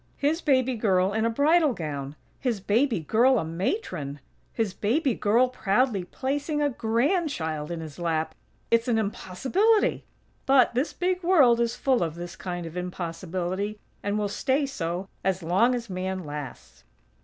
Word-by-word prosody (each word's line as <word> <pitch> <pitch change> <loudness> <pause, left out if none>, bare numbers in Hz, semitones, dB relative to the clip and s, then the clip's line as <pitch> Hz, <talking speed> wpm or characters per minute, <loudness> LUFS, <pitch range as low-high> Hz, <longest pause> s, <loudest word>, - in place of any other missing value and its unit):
His 305 +4 +1
baby 260 -3 +2
girl 195 -3 +2
in 220 +1 +1
a - - +3
bridal 295 +4 +3
gown! 145 -5 -5 0.2
His 245 -6 -1
baby 225 - +1
girl 240 - +4
a 185 - -1
Matron! 165 - -3 0.3
His 220 -5 -1
baby 260 - +1
girl 230 +5 +3
proudly 220 -3 0
placing 285 - -2
a 290 -1 +2
grandchild 230 - 0
in 170 -1 -4
his 155 0 -9
lap!! 160 -2 -1 0.4
It's 230 +1 +3
an 235 -2 +2
impossibility!! 265 - +1 0.4
But 265 -2 +5
this 255 +6 0
big 365 0 -1
world 295 -10 +5
is 235 0 +1
full 260 -3 +1
of 165 -2 -1
this 175 +1 -7
kind 175 -2 -5
of 165 +1 -8
impossibility, 180 +3 -3 0.2
and 205 +1 -1
will 210 -1 0
stay 265 +7 0
so 180 -7 -3 0.2
as 190 -1 0
long 205 +10 +3
as 235 -1 -5
Man 185 -1 -3
lasts. 140 - -8
215 Hz, 155 wpm, -26 LUFS, 175-265 Hz, 0.4 s, But